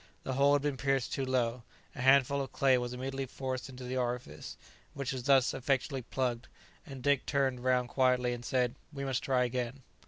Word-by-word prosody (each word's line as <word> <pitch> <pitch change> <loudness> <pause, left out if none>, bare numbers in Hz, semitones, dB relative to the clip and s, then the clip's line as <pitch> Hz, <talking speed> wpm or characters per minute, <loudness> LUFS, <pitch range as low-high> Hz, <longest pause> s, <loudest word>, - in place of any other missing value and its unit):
The 130 - -3
hole 140 +2 +4
had 145 -1 +2
been 145 -2 -1
pierced 135 0 0
too 135 - -1
low. 125 -2 0 0.3
A - - -7
handful 140 +1 +4
of 135 - -5
clay 135 -2 +4
was 120 0 -3
immediately 135 +2 -4
forced 130 0 -4
into 130 -1 -9
the 125 +1 -3
orifice, 120 -11 -4 0.4
which 140 -3 -3
was 125 -2 -5
thus 135 -2 +4
effectually 135 +1 -1
plugged; 120 -1 -2 0.4
and 135 -3 -9
Dick 140 -1 +3
turned 130 -2 0
round 125 -1 +2
quietly, 125 -2 +2
and 120 0 -6
said, 125 -1 +1 0.2
"We 140 -2 -5
must 130 -2 -1
try 130 -2 +2
again." 125 +1 -3
130 Hz, 195 wpm, -32 LUFS, 125-135 Hz, 0.4 s, hole